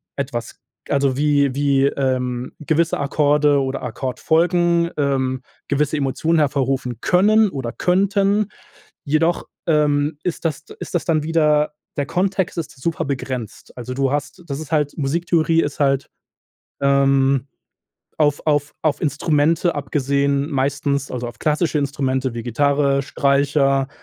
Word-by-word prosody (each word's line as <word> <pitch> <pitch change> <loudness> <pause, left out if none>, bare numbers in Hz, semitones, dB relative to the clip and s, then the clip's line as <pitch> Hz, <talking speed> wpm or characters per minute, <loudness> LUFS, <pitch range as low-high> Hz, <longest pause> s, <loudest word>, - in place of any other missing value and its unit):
etwas 125 -4 -4 0.3
also, 140 -2 +1
wie 145 -2 +2
wie, 140 -1 +2
ähm, 130 -2 -1
gewisse 165 +2 +1
Akkorde 145 0 +2
oder 135 0 -3
Akkordfolgen, 170 +7 +1
ähm, 130 -2 0 0.2
gewisse 150 +1 0
Emotionen 155 +4 0
hervorrufen 135 -4 0
können 210 +3 +4
oder 130 -6 -4
könnten, 200 - +1 0.6
jedoch, 160 +4 +1 0.2
ähm, 150 -1 +1
ist 175 -1 -3
das 155 -1 -2 0.2
ist - - -7
das 175 - 0
dann 155 -3 +1
wieder 150 -2 +2 0.2
der 140 - 0
Kontext 190 +2 -1
ist 140 -4 -7
super 165 +3 -2
begrenzt. 130 -5 -5
Also, 125 +1 -6
du 135 0 +1
hast 145 +5 -3
das 140 +1 -4
ist 155 - -9
halt 150 -2 0
Musiktheorie 165 +2 +1
ist 145 0 -5
halt, 135 -1 +1 0.7
ähm, 135 -1 +3 0.7
auf 145 -2 +1
auf 145 -1 +1
auf 150 -2 0
Instrumente 155 +3 +1
abgesehen 140 0 0
meistens 140 0 -1
also, 125 -1 -4
auf 120 - -9
klassische 155 +1 +1
Instrumente, 130 -3 -1
wie 115 -1 -5
Gitarre, 140 +3 +1
Streicher, 140 -1 +1
145 Hz, 130 wpm, -20 LUFS, 135-160 Hz, 0.7 s, können